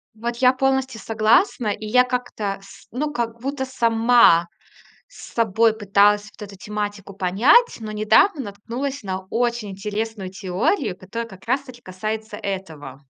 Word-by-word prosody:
Вот 235 +2 -4
я 250 +1 +5
полностью 265 -2 0
согласна, 225 - +2
и 210 +1 -3
я 250 +4 +5
как-то, 245 -5 -3
с 195 0 -16
ну, 295 +5 -2
как 235 -4 -4
будто 270 +1 -3
сама 230 -7 +4 0.6
с - - -13
собой 225 0 +2
пыталась 205 0 +3
вот - - -19
эту 200 -1 -8
тематику 205 -1 -5
понять, 210 - +3
но 215 -1 -6
недавно 220 - +3
наткнулась 240 +6 -5
на 190 -1 -5
очень 235 -2 -1
интересную 210 0 -4
теорию, 190 - -1
которая 230 +5 -6
как 190 -2 -14
раз 260 +4 +1
таки 255 -3 -14
касается 215 +3 -5
этого. 160 -9 -6
220 Hz, 145 wpm, -22 LUFS, 200-245 Hz, 0.6 s, я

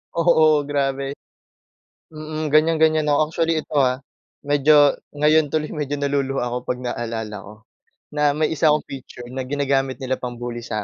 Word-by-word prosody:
Oo, 155 -3 +3
grabe. 140 -1 -1 1.0
Mm, 155 -1 -5
ganyan-ganyan 155 0 +3
ako. 150 +2 +2
Actually 165 -2 0
ito 150 - -9
ha, 130 0 +1 0.4
medyo 145 0 +4 0.2
ngayon 150 +1 +3
tuloy 155 +1 -2
medyo 145 -2 -3
naluluha 140 -2 -1
ako - - -2
kapag 125 0 -2
naalala 115 -3 -4
ko 105 +2 -12 0.6
na 150 -1 +2
may 155 0 0
isa 160 0 +2
akong 150 - +1
picture 130 -2 -9
na 130 0 -4
ginagamit 135 -2 0
nila 130 0 -3
pang 125 -1 -5
bully 120 0 -6
sa 110 -3 -4
145 Hz, 155 wpm, -21 LUFS, 130-155 Hz, 1.0 s, medyo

